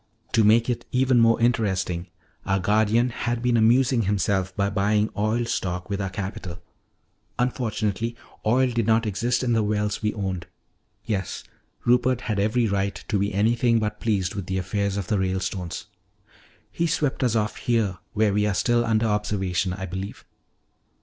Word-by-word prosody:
To 115 - +4
make 115 +3 +5
it 120 -1 -2
even 130 -1 +3
more 115 0 +4
interesting, 95 -7 0 0.4
our 95 - +1
guardian 110 +5 +2
had 120 0 -2
been 125 -1 +2
amusing 120 +2 +4
himself 95 -2 0
by 100 0 0
buying 105 +1 +1
oil 110 +3 0
stock 90 -4 -3
with 100 0 -1
our 95 - -2
capital. 95 -2 -5 0.8
Unfortunately, 115 -2 -1 0.3
oil 125 +3 +3
did 115 -3 -1
not 115 +1 +3
exist 120 +5 0
in 120 -2 +1
the 115 - +3
wells 105 -1 -1
we 105 -1 +1
owned. 95 -4 -3 0.6
Yes, 95 -5 -3 0.4
Rupert 125 0 +3
had 110 -5 -2
every 110 +4 +2
right 100 -1 -1
to 105 - +1
be 100 +1 0
anything 115 +4 +2
but 105 -1 -2
pleased 100 -5 0
with 100 -3 -5
the 95 - -1
affairs 100 +2 -1
of 100 - -2
the 105 +1 0
Ralestones. 95 -1 -2 0.9
"He 170 - 0
swept 150 -5 0
us 120 -3 +2
off 105 -1 0
here 110 -7 0
where 105 -2 +2
we 105 +1 +2
are 100 - 0
still 120 +4 +2
under 115 -1 +1
observation, 100 -4 0
I 95 +1 -4
believe." 95 +2 -6
105 Hz, 165 wpm, -24 LUFS, 100-115 Hz, 0.9 s, make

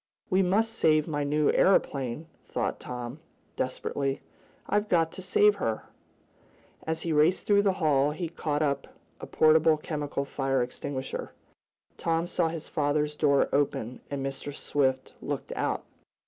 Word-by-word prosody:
"We 185 +1 +4
must 215 +5 +2
save 155 -5 +3
my 145 -2 -1
new 150 +1 +2
aeroplane!" 140 -6 +2 0.2
thought - - -2
Tom, 125 +3 -6 0.4
desperately. 135 +1 -2 0.5
"I've 210 +1 0
got 165 -2 +3
to - - -8
save 205 +3 +4
her!" 115 - -2 1.0
As 160 0 -1
he 165 - -1
raced 155 +5 +3
through 205 -1 +5
the 200 -2 +2
hall 145 -6 +2
he 160 +3 -3
caught 155 -2 -2
up 140 -2 -1 0.3
a - - -7
portable 155 0 +4
chemical 145 -2 -3
fire 135 -2 0
extinguisher. 130 +2 -5 0.6
Tom 165 0 0
saw 175 -1 +1
his 160 -1 -5
father's 150 0 0
door 140 -2 +3
open, 130 -4 0
and 140 -1 -3
Mr. 135 +1 -4
Swift 130 -2 -1
looked - - -4
out. - - -1
150 Hz, 145 wpm, -28 LUFS, 140-165 Hz, 1.0 s, through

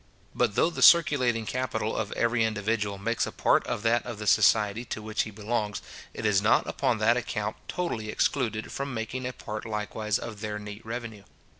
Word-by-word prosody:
But 120 -5 +1
though 170 - +3
the - - -5
circulating 130 -9 +5
capital 110 -3 -2
of 105 -2 -2
every 115 0 +1
individual 105 -1 -1
makes 115 +4 -1
a - - -5
part - - +2
of 120 -3 -3
that 115 +1 +2
of 120 -3 -6
the 105 - -6
society 105 +2 +4
to 110 - -5
which 110 0 -2
he - - -3
belongs, 105 0 -2 0.3
it 115 - -6
is 100 -2 +3
not 110 +2 +3
upon 115 - 0
that 115 +3 +3
account 105 -3 -3
totally 115 -12 -3
excluded 110 -3 -1
from 140 -2 -4
making 120 +3 -3
a 125 - -5
part 110 -2 -6
likewise 105 0 -2
of 110 -3 -8
their 105 -1 -3
neat 105 +1 -8
revenue. 115 -3 -6
110 Hz, 190 wpm, -27 LUFS, 105-120 Hz, 0.3 s, circulating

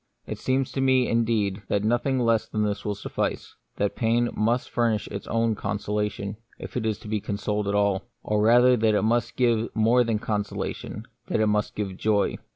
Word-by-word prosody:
It - - -6
seems 130 0 0
to 135 - -2
me, 130 -1 +3
indeed, 110 -4 +1
that 100 - 0
nothing 120 +4 +1
less 115 -3 +2
than 105 -1 -1
this 100 -1 -2
will 105 -1 -2
suffice; 100 - -3 0.2
that 100 0 -1
pain 120 +1 +1
must 115 +4 0
furnish 115 -3 +1
its 100 -1 -6
own 115 0 +1
consolation, 105 0 -3 0.2
if - - -9
it 115 -3 -1
is 110 -2 0
to - - -10
be 105 -1 -1
consoled 105 0 -2
at 100 - 0
all; 100 0 +1 0.2
or 105 0 0
rather 120 +3 +6
that 110 -2 +2
it - - +2
must 115 +2 +1
give 120 -2 +2
more 115 +3 +4
than 115 -2 0
consolation 105 -2 -4
— - - -45
that - - 0
it 110 - +3
must 105 0 0
give 100 -3 -3
joy. 105 -1 +1
110 Hz, 200 wpm, -25 LUFS, 105-120 Hz, 0.2 s, rather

